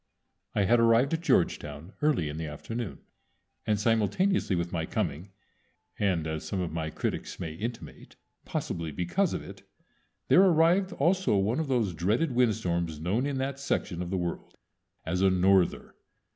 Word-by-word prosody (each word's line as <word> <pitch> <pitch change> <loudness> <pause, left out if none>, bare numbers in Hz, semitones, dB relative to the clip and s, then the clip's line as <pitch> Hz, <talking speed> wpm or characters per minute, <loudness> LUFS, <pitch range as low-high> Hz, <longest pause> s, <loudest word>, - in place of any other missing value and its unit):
I 100 - +3
had 120 +5 +4
arrived 115 +5 +4
at 165 - 0
Georgetown 75 - 0
early 150 - +2
in 75 +1 -5
the 80 -1 -4
afternoon, 110 +8 -6 0.7
and 105 -1 +2
simultaneously 115 - +1
with 85 0 -2
my 80 -2 -2
coming 85 +6 -3 0.7
and, 95 -6 +1
as 80 -1 -3
some 95 +5 -3
of 90 -2 -2
my 80 -1 -2
critics - - -4
may 80 -4 -4
intimate, 115 +8 -7 0.3
possibly 80 -2 -3
because 90 - 0
of - - -4
it - - -11 0.7
there 185 - +6
arrived 180 +1 +4
also 180 - +2
one 105 +8 +1
of 160 - -1
those 120 -8 +1
dreaded 105 - 0
windstorms 90 -10 0
known 100 - 0
in 140 -2 -2
that 135 +1 -3
section 100 -9 -2
of 90 - -4
the 95 - -1
world 85 -1 -4 0.5
as 90 +3 -1
a 95 - +5
norther. 95 0 +2
100 Hz, 160 wpm, -28 LUFS, 85-130 Hz, 0.7 s, there